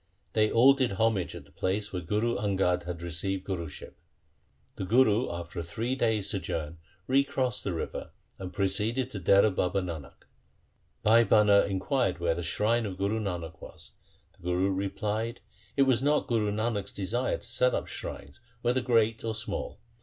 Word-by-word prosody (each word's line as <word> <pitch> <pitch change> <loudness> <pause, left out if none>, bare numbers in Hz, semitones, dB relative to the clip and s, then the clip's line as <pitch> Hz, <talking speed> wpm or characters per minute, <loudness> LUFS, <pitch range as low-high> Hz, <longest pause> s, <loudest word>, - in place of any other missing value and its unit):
They 110 -1 +3
all 130 +4 +7
did 130 -6 0
homage 105 -2 +1
at 70 - -9
the 70 - -22
place 100 +6 -2
where 90 - -2
Guru 105 +7 0
Angad 95 -4 +1
had 85 -1 -5
received 90 +3 -3
Guruship. 85 -6 -5 0.8
The - - -4
Guru 115 +2 +3
after 85 +1 -6
a - - -3
three 115 +9 -3
days' 110 -6 +1
sojourn 80 -4 -4 0.3
re 135 +2 +4
crossed 130 -4 -1
the 100 - -2
river, 80 - -4 0.3
and 95 -1 -6
proceeded 115 +6 0
to 100 - -5
Dehra 100 +3 +4
Baba 90 +2 +1
Nanak. 85 -6 -7 0.8
Bhai 115 +2 +6
Bhana 105 -2 +5
inquired 95 - 0
where 85 -1 +1
the 85 - -4
shrine 110 +7 +1
of 95 -2 -6
Guru 100 +3 0
Nanak 85 -6 -5
was. - - -12 0.4
The - - -25
Guru 90 +2 +1
replied, 105 +4 -2 0.2
' - - -30
It 140 - +6
was 130 -3 +3
not 150 +2 +2
Guru 110 -3 +1
Nanak's 110 -1 -2
desire 110 +6 -1
to - - -16
set 125 +1 +2
up - - -2
shrines 70 +8 -7 0.2
whether 125 +2 +2
great 115 -2 +2
or 110 -1 -2
small. 110 - -4
105 Hz, 175 wpm, -29 LUFS, 90-115 Hz, 0.8 s, all